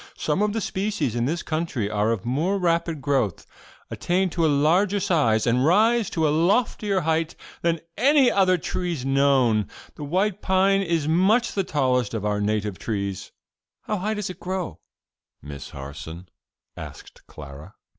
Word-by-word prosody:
Some 155 Hz, +6 st, -1 dB
of 210 Hz, 0 st, +2 dB
the 225 Hz, -, -2 dB
species 190 Hz, -, -2 dB
in 120 Hz, 0 st, 0 dB
this 165 Hz, +6 st, -2 dB
country 155 Hz, -9 st, -2 dB
are 105 Hz, +1 st, 0 dB
of 115 Hz, -3 st, -3 dB
more 155 Hz, +11 st, 0 dB
rapid 170 Hz, -4 st, 0 dB
growth, 130 Hz, -, 0 dB, 0.5 s
attain 185 Hz, +1 st, 0 dB
to 170 Hz, -, -1 dB
a -, -, +4 dB
larger 170 Hz, +8 st, +2 dB
size 150 Hz, -, +2 dB
and 125 Hz, +1 st, +2 dB
rise 215 Hz, +7 st, +3 dB
to 160 Hz, -2 st, 0 dB
a 145 Hz, -, +1 dB
loftier 200 Hz, +2 st, +1 dB
height 160 Hz, 0 st, -1 dB, 0.3 s
than 170 Hz, -1 st, 0 dB, 0.2 s
any 275 Hz, +1 st, +4 dB
other 185 Hz, -2 st, +3 dB
trees 170 Hz, -5 st, -3 dB
known. 135 Hz, -6 st, +3 dB, 0.3 s
The 150 Hz, -, -9 dB
white 190 Hz, +7 st, 0 dB
pine 195 Hz, +1 st, +3 dB
is 165 Hz, -5 st, -1 dB
much 195 Hz, +9 st, +3 dB
the 195 Hz, -, -1 dB
tallest 125 Hz, -, 0 dB
of 105 Hz, -2 st, -3 dB
our 105 Hz, 0 st, 0 dB
native 105 Hz, -2 st, -1 dB
trees.'" 100 Hz, -3 st, -4 dB, 0.5 s
"How 210 Hz, -, -2 dB
high 210 Hz, +3 st, -2 dB
does 210 Hz, -3 st, -3 dB
it -, -, -13 dB
grow, 180 Hz, -, -4 dB, 0.6 s
Miss 70 Hz, -1 st, -9 dB
Harson?" 75 Hz, +6 st, -9 dB, 0.5 s
asked -, -, -11 dB
Clara. 75 Hz, +5 st, -11 dB
160 Hz, 160 wpm, -24 LUFS, 115-190 Hz, 0.6 s, a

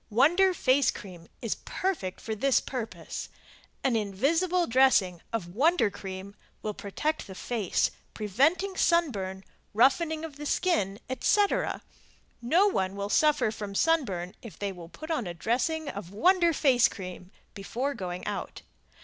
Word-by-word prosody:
Wonder 325 Hz, -, +4 dB
Face 270 Hz, -5 st, +3 dB
Cream 175 Hz, -4 st, -7 dB, 0.2 s
is 230 Hz, -, 0 dB
perfect 335 Hz, -, -2 dB
for 220 Hz, -, -4 dB
this 265 Hz, +5 st, +3 dB
purpose. 245 Hz, -4 st, -6 dB, 0.5 s
An 265 Hz, -3 st, +2 dB
invisible 320 Hz, -, +1 dB
dressing 230 Hz, -, +3 dB
of 175 Hz, -7 st, -4 dB
Wonder 295 Hz, -, +3 dB
Cream 190 Hz, +1 st, -7 dB, 0.3 s
will 215 Hz, -, -2 dB
protect 300 Hz, +12 st, -3 dB
the 190 Hz, -, -9 dB
face, 220 Hz, -2 st, 0 dB, 0.2 s
preventing 310 Hz, -, +1 dB
sunburn, 205 Hz, -, +1 dB, 0.3 s
roughening 310 Hz, +7 st, +3 dB
of 295 Hz, -3 st, -10 dB
the 295 Hz, 0 st, -5 dB
skin, 210 Hz, -, +1 dB
etc, 400 Hz, +10 st, +1 dB, 0.6 s
No 330 Hz, +12 st, +4 dB
one 190 Hz, -, 0 dB
will 200 Hz, 0 st, -3 dB
suffer 295 Hz, -3 st, +3 dB
from 205 Hz, -2 st, -6 dB
sunburn 200 Hz, -, +1 dB
if 230 Hz, -, -11 dB
they 200 Hz, -1 st, -2 dB
will 175 Hz, -3 st, -10 dB
put 315 Hz, -, -8 dB
on 255 Hz, -, -1 dB
a 175 Hz, -, -5 dB
dressing 265 Hz, -, -1 dB
of 200 Hz, -7 st, -6 dB
Wonder 345 Hz, -, +4 dB
Face 265 Hz, -6 st, +4 dB
Cream 180 Hz, -2 st, -8 dB, 0.2 s
before 245 Hz, +8 st, -3 dB
going 180 Hz, -5 st, -5 dB
out. -, -, -5 dB
240 Hz, 140 wpm, -28 LUFS, 195-315 Hz, 0.6 s, Wonder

